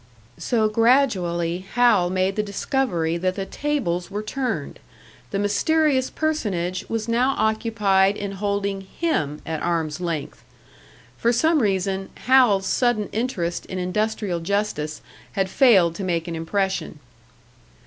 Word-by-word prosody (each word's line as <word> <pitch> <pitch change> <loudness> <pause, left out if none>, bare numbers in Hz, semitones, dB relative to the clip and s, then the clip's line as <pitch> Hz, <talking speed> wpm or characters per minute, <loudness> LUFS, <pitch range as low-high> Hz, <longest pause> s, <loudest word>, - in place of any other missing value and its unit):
So, 225 -3 +1
gradually, 190 -8 +2
Hal 230 -8 +4
made 185 +1 0
the 215 - +1
discovery 200 - -1
that 185 +1 -1
the 195 - -3
tables 195 -12 -2
were 205 +2 -4
turned 225 - -3 0.5
the - - -2
mysterious 260 +7 +2
personage 195 - -2
was 225 0 -2
now 250 +4 +2
occupied 210 -3 +2
in 200 -1 -4
holding 200 0 -2
him 190 - -2
at 160 -1 -3
arm's 165 -1 -1
length! 165 -5 -4 0.8
For 235 - +3
some 310 +6 +3
reason, 195 -2 -1 0.2
Hal's 245 -7 +5
sudden 240 -2 +1
interest 200 -8 -2
in 185 - -5
industrial 200 0 -1
justice 165 -5 -2 0.3
had 195 -1 -1
failed 195 - +5
to 200 - -4
make 170 -2 -1
an 170 - -4
impression. 190 +1 -2
200 Hz, 130 wpm, -23 LUFS, 175-230 Hz, 0.8 s, Hal's